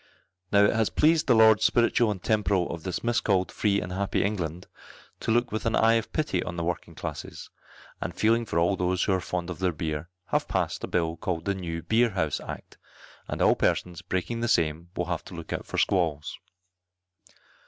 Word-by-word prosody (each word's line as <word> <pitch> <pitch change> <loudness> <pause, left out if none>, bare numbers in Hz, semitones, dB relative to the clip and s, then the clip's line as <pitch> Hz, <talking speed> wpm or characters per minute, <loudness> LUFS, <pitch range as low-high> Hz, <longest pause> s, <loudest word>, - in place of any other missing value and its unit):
Now 100 0 +6
it - - +3
has 110 -1 +1
pleased 160 +1 +3
the 125 - +5
Lords 110 -1 +6
spiritual 120 0 +3
and 95 -4 -4
temporal 100 -4 +1
of 85 - -7
this 90 +2 -4
miscalled 105 -5 +1
free 100 -2 +1
and 90 - -5
happy 100 +1 0
England, 90 -4 -3 0.5
to - - -4
look 120 +2 +2
with 110 +1 -2
an 110 - +1
eye 115 +1 +4
of 115 -1 0
pity 150 - 0
on 90 - -5
the 85 - -3
working 85 +1 -4
classes; - - -7 0.5
and - - -4
feeling 115 +2 +3
for 85 - -2
all 85 +3 +3
those 90 0 0
who 100 - +2
are 95 - 0
fond 90 0 -3
of 85 - -7
their 95 -1 +1
beer, 80 0 -4 0.2
have - - 0
passed - - -1
a - - -2
bill 85 -1 -1
called 85 0 -3
the 100 - +1
New 85 -4 -5
Beer 115 +7 +3
House 80 -8 -1
Act, - - -9 0.5
and - - -1
all - - +6
persons 90 -1 0
breaking 95 +6 -3
the 120 - -1
same 85 -3 +1
will 90 - -1
have 85 -1 -3
to 90 - -10
look 85 -1 -6
out - - -5
for - - -5
squalls. 80 -6 0
95 Hz, 205 wpm, -27 LUFS, 85-110 Hz, 0.5 s, Now